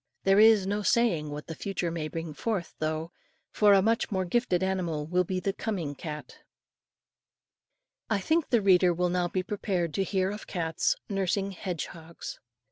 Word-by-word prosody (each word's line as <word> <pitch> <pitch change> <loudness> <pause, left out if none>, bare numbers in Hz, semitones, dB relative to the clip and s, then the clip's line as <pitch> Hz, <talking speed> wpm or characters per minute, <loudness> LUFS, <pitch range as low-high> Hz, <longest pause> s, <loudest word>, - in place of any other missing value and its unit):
There 195 +1 +5
is 220 -3 +7
no 205 +2 -1
saying 190 -8 +2
what 145 +1 -6
the 165 - -6
future 180 -1 -3
may 160 -2 -3
bring 165 0 -5
forth, 200 +1 -3
though, 155 +2 -2 0.4
for 210 -1 +5
a 195 -1 +5
much 225 +2 +1
more 190 -2 -1
gifted 190 -2 +1
animal 175 -6 -1
will 180 +3 +2
be 185 +1 -2
the 195 +2 -1
coming 185 -10 -3
cat. 150 +1 -8 1.7
I 220 - +2
think 315 - +1
the 235 -4 +3
reader 180 -2 +5
will 180 +1 +1
now 180 0 +1
be 185 +1 -2
prepared 185 -5 -2
to 195 - +1
hear 190 -1 0
of 210 +1 -8
cats 165 -3 0
NURSING 195 0 -1
HEDGEHOGS. 170 -3 -6
185 Hz, 170 wpm, -28 LUFS, 165-200 Hz, 1.7 s, is